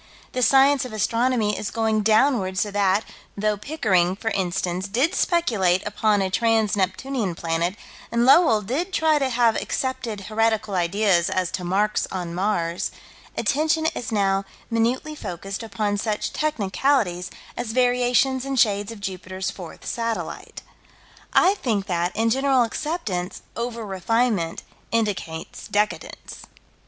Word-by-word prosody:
The 255 - -2
science 275 +2 +5
of 250 -3 -7
astronomy 230 0 +1
is 200 - -3
going 220 -1 +1
downward 215 -3 +2
so 205 +2 0
that, 200 +1 +2 0.3
though 210 +1 +1
Pickering, 195 - +1
for 225 +2 -3
instance, 180 0 -1
did 255 - +1
speculate 210 - +2
upon 210 -1 +1
a 190 - -2
Trans 225 0 +2
Neptunian 200 +1 -1
planet, 170 +3 -1 0.4
and 235 +1 +2
Lowell 250 -6 +6
did 315 - -2
try 315 -3 +3
to 270 -2 0
have 235 -2 +3
accepted 240 -5 -3
heretical 220 0 0
ideas 180 0 +2
as 185 -1 -1
to 185 - -4
marks 200 +4 +1
on 175 -2 -4
Mars, 175 -2 -1 0.5
attention 315 +2 +1
is 235 - -5
now 195 -2 +2 0.3
minutely 235 +7 0
focused 195 - -6
upon 205 -1 -2
such 210 -1 -2
technicalities 215 -8 0 0.3
as 240 -2 -3
variations 250 +1 +2
in 275 0 -3
shades 205 -3 +2
of 220 -3 -10
Jupiter's 185 0 -4
fourth 180 -5 -10
satellite. 230 -1 -4 0.7
I 375 - +5
think 220 - -1
that, 175 -1 0
in 225 +1 +1
general 265 0 +3
acceptance, 225 - -3
over 235 -1 -4
refinement 195 -2 0 0.3
indicates 200 -8 -2
decadence. 210 +1 -3
215 Hz, 135 wpm, -23 LUFS, 190-245 Hz, 0.7 s, Lowell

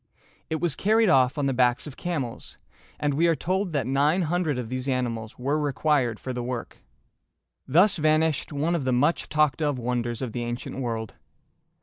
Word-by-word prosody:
It 160 - -1
was 175 -5 0
carried 220 +1 +3
off 130 -1 +4
on 145 - 0
the 135 - +1
backs 125 0 +2
of 145 -3 -8
camels, 145 -10 -5 0.4
and 145 -1 0
we 165 +5 +3
are 165 - +3
told 185 +3 -1
that 140 -5 0
nine 145 +7 +2
hundred 165 -3 0
of 125 -2 -4
these 130 +2 -4
animals 120 -4 -2
were 140 +5 0
required 140 -5 +1
for 130 - -5
the 125 - -3
work. 120 -1 -5 0.9
Thus 180 +8 +4
vanished 155 0 +1
one 150 +4 0
of 165 -5 -1
the 130 -1 +1
much 145 +7 +1
talked 150 -1 +2
of 145 -3 0
wonders 120 0 -2
of 125 - -3
the 120 - -3
ancient 120 +3 -5
world. 115 -4 -3
140 Hz, 190 wpm, -26 LUFS, 125-160 Hz, 0.9 s, off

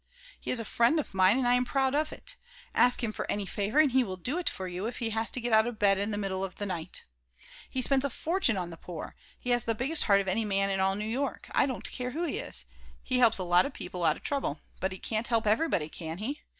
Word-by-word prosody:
He - - -7
is 250 - +2
a 230 - -3
friend 235 +9 +3
of 295 - -4
mine 190 +4 +5
and 260 -2 +1
I 245 - +5
am 250 0 +3
proud 265 +1 +1
of 305 +1 +1
it. - - -5 0.4
Ask 245 0 +4
him 225 - 0
for - - -5
any 205 -1 -1
favor 205 +6 -2
and 305 -3 +6
he 260 +1 +4
will 190 -5 -5
do 255 - -2
it 360 - +1
for 190 - -6
you 180 +4 -3
if 240 - -5
he 230 -2 -2
has 225 +1 0
to - - 0
get 240 -1 -1
out 220 +1 +6
of 240 -2 -4
bed 195 -2 +3
in 200 +2 0
the 205 - -2
middle 195 -2 -2
of 190 -1 -5
the 205 - -4
night. 180 -3 -4 0.7
He 255 - -2
spends 275 0 +3
a 280 - +1
fortune 315 - 0
on 175 -2 -3
the 165 - -9
poor. 165 -1 -8 0.2
He 245 - -2
has 240 -1 +2
the 230 - 0
biggest 280 +8 +1
heart 200 -2 +5
of 195 - -2
any 205 +4 +1
man 195 -1 +1
in 195 - 0
all 190 0 +2
New 210 +1 -3
York, 255 +5 -3
I - - +3
don't 255 -4 -4
care 250 -1 -3
who 315 +7 -3
he 330 - -1
is. - - -5 0.4
He 250 - 0
helps 235 -3 +6
a 185 - 0
lot 175 +6 +4
of 280 - -9
people 180 0 -5
out 155 -2 +3
of - - -17
trouble, 275 - -1 0.2
but 190 - -1
he 190 - -6
can't 220 +4 -2
help 230 -2 +1
everybody, 215 - +2
can 160 +1 -6
he? 275 +9 -4
220 Hz, 285 wpm, -29 LUFS, 190-255 Hz, 0.7 s, and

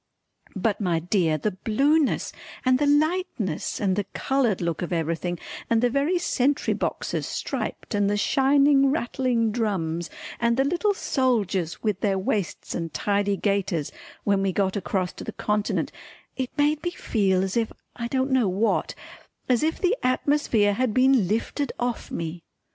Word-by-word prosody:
But 205 +2 0
my 175 -4 +1
dear 165 -2 +1
the 210 +8 -1
blueness 275 - +1 0.3
and 255 0 +4
the 290 - +2
lightness 290 - 0
and 195 -3 +1
the 205 -1 -1
coloured 260 -7 +1
look 170 -2 -2
of 175 - -3
everything 170 +1 -1 0.3
and 230 - +3
the 245 +1 +2
very 285 +8 +1
sentry 285 -4 +1
boxes - - -2
striped - - -4
and 205 -1 +2
the 205 - +1
shining 275 +4 +4
rattling 245 -4 0
drums 175 -7 -1 0.3
and 235 +1 +2
the 270 - +4
little 355 +8 +1
soldiers 210 - 0
with 210 -4 0
their 195 -1 +1
waists 190 0 -2
and 165 -1 -3
tidy 200 +3 0
gaiters, 190 -7 0 0.3
when 200 -1 +2
we 195 -1 +1
got 190 +1 0
across 190 -2 -1
to - - -9
the - - -5
Continent 210 0 -1 0.4
it 260 -2 -2
made 295 +1 +2
me 350 - -1
feel 195 - +1
as 190 0 -2
if 230 -2 +1 0.2
I 235 - -3
don't 265 +2 0
know 255 -5 +3
what 200 +5 0 0.5
as 250 -2 +3
if 315 +1 0
the 375 +5 +2
atmosphere 255 -5 +2
had 240 0 0
been 255 -6 +4
lifted 230 +7 -1
off 245 -1 -2
me. 165 +1 -5
220 Hz, 160 wpm, -25 LUFS, 190-270 Hz, 0.5 s, and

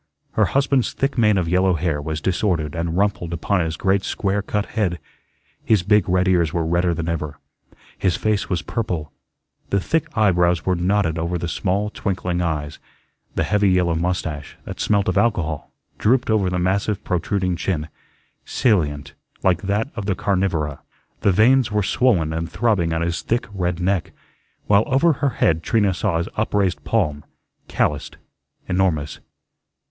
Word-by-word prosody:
Her - - +2
husband's 135 -2 +1
thick 135 +1 -1
mane 105 -4 +3
of 90 -3 0
yellow 90 +1 +3
hair 80 -2 -1
was 80 +1 -4
disordered 85 -5 0
and 85 +1 -2
rumpled 95 -4 0
upon 90 +3 0
his 80 -1 -2
great 95 0 +2
square 100 0 -1
cut 105 +1 -2
head; 95 -6 -1 0.7
his 105 -5 +3
big 105 0 +3
red 90 +1 +2
ears 85 -4 +3
were 85 -2 -1
redder 85 +1 +1
than 85 0 -3
ever; 75 -3 -3 0.6
his 95 -3 +1
face 105 -1 0
was 85 -2 -1
purple; 90 -10 -3 0.6
the 100 - +2
thick 160 - 0
eyebrows 90 -5 +3
were 95 - +2
knotted 90 -2 +1
over 85 +2 -1
the 85 - -3
small, 100 +4 -1
twinkling 90 -4 -2
eyes; 80 -3 -3 0.6
the - - +1
heavy 105 -2 +2
yellow 90 -2 +2
mustache, 80 -3 -3
that - - -7
smelt 100 -1 +1
of 95 +1 +2
alcohol, 90 -9 -1 0.3
drooped 125 +1 +2
over 100 -4 +2
the 90 - -1
massive, 95 +3 0
protruding 90 +1 -1
chin, 85 -3 -2 0.6
salient, 75 - 0 0.3
like 95 -1 +2
that 105 +6 -1
of 105 -4 -4
the 95 - +1
carnivora; 95 -8 -1 0.4
the 100 - +3
veins 115 +5 +4
were 105 -1 +1
swollen 95 -9 +2
and 80 +1 -3
throbbing 100 -7 +1
on 80 0 0
his 85 0 -2
thick 120 +1 -1
red 90 -2 -1
neck; 90 -1 -1 0.5
while 100 0 +5
over 145 +5 +3
her 140 0 0
head 80 -9 +1
Trina 100 +1 +2
saw 90 -1 0
his 85 - -2
upraised 100 -4 0
palm, 75 -1 0 0.4
callused, - - -1 0.5
enormous. 90 -6 0
90 Hz, 165 wpm, -21 LUFS, 85-105 Hz, 0.7 s, while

